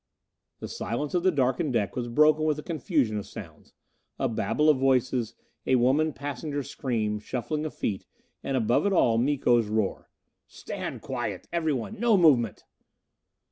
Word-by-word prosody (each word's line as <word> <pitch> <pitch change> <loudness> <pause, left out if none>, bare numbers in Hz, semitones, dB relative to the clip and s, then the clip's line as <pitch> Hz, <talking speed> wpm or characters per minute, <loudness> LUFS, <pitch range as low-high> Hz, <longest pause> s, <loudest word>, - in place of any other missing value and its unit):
The - - -4
silence 140 +5 -4
of 180 - +2
the 185 - +3
darkened 135 -1 0
deck 105 -5 0
was 120 -1 -2
broken 150 +5 +4
with 155 -1 +1
a 150 - -6
confusion 150 - 0
of 100 - -8
sounds. - - -11 0.5
A - - 0
babble 150 +6 0
of 150 -4 +5
voices; 130 -3 +1 0.3
a 130 - +4
woman 135 +6 +3
passenger's 145 0 -5
scream; 110 -5 -2
shuffling 150 +8 -3
of - - -10
feet; 100 -3 -3 0.4
and 135 -1 -1
above 120 - +2
it 200 - +1
all, 115 -10 +3
Miko's 120 -4 +2
roar: 110 -2 -2 0.4
"Stand - - -7
quiet! - - -4
Everyone! 160 - -2
No 230 -3 +4
movement!" 135 - +3
135 Hz, 155 wpm, -27 LUFS, 120-155 Hz, 0.5 s, of